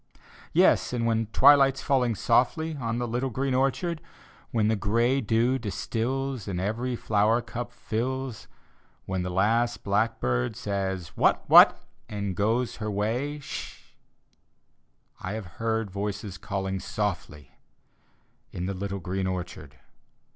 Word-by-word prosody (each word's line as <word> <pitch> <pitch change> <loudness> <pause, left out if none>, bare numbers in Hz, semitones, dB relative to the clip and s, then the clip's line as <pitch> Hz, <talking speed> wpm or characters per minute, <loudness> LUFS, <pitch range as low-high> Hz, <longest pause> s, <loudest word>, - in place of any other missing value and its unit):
Yes, - - +3
and 120 -1 -1
when 115 -1 +1
twilight's 135 +3 +5
falling 125 -5 +2
softly 130 - +1
On 115 -4 -3
the 120 0 -2
little 125 +3 -1
green 130 +3 -1
orchard; 145 +6 0 0.5
When 110 -2 +1
the 110 - +2
gray 115 +6 +1
dew 120 +4 +1
distils 120 +4 -3
And 90 -3 -3
every 115 +6 -2
flower 110 +1 +2
cup 120 0 -6
fills; 125 +1 -4 0.6
When 95 -1 -2
the 90 - -3
last 115 +6 +1
blackbird 100 - 0
says, 95 -4 -3
"What - - +2
— - - -30
what!" - - +8 0.3
and 100 -3 -3
goes 115 +5 0
her 110 -1 -3
way 115 +9 -1
— - - -14
sshi - - -6 1.4
I 95 - -4
have 110 -2 -5 0.2
heard 110 -3 -1
voices 100 -1 -4
calling 95 -1 -3
softly 85 - -4 1.0
In 90 - -4
the 100 - -2
little 100 +1 -4
green 95 +2 -2
orchard. 90 -7 -6
110 Hz, 135 wpm, -27 LUFS, 100-125 Hz, 1.4 s, what